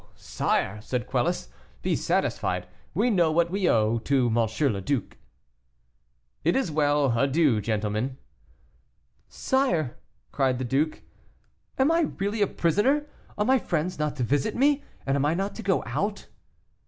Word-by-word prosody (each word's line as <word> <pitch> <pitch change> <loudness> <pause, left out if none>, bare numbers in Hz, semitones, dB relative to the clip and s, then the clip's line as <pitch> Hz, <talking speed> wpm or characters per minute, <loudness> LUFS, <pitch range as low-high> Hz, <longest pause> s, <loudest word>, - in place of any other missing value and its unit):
sire," 105 +2 -1
said 125 +2 -3
Quelus, 130 +8 -1 0.4
"be - - +1
satisfied; - - -1 0.3
we 245 - +2
know 170 -6 +3
what 170 +1 +2
we 195 -2 +1
owe 110 +1 +2
to 130 +1 +1
M. 115 +3 +1
le 100 - -4
Duc." 130 +3 -2 1.3
"It 170 +4 +2
is 265 -11 0
well; 145 -4 +2
adieu, 140 -4 +3
gentlemen." 110 +4 -2 1.1
"Sire," 175 - 0 0.3
cried 135 -3 +1
the 130 - -3
duke, 145 +5 0 0.7
"am 270 +4 +3
I 330 -2 +3
really 205 +2 -1
a 205 - +4
prisoner, 210 - +1 0.3
are 210 - +1
my 260 +2 +4
friends 175 -4 -2
not 150 -1 -1
to 130 - -2
visit 140 - 0
me, 285 +2 +3 0.2
and 135 - +1
am 140 - +1
I 150 +3 +2
not 195 +3 -2
to - - -7
go 195 -3 +1
out?" 205 +1 -2
150 Hz, 150 wpm, -26 LUFS, 125-200 Hz, 1.3 s, a